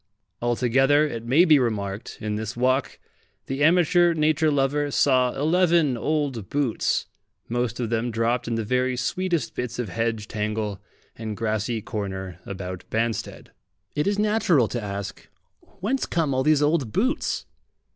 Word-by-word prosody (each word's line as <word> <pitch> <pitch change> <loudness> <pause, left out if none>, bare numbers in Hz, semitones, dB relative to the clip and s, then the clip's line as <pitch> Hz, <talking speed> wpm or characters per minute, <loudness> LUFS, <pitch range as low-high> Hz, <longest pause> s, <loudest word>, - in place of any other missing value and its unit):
Altogether, 130 +5 +3
it 115 -6 -5
may 150 +9 +5
be 155 -4 +6
remarked, 105 -4 -3
in 105 0 -3
this 110 +2 -4
walk 130 +2 +1 0.5
the 135 +2 -2
amateur 175 +1 +4
nature 155 0 +2
lover 145 +1 +1
saw 130 -2 +2
eleven 165 -2 +3
old 140 -5 -2
boots, 140 -5 0 0.4
most 120 0 -2
of 120 -2 -2
them 115 +1 0
dropped 115 +2 0
in 115 - -1
the 115 - -1
very 125 +3 0
sweetest 180 +4 -1
bits 125 -1 -4
of 120 -4 -3
hedge 110 +2 -2
tangle 105 -2 -3 0.3
and 110 -2 -5
grassy 110 0 -1
corner 95 -4 -5
about 95 -2 -6
Banstead. 115 0 -2 0.4
It 150 +4 0
is 200 0 +1
natural 210 - +3
to 120 - -3
ask, 100 -1 -6 0.5
"Whence 255 +8 0
come 160 -5 0
all 130 - +1
these 150 +1 +3
old 145 -6 +1
boots?" 255 - 0
125 Hz, 145 wpm, -24 LUFS, 110-150 Hz, 0.5 s, be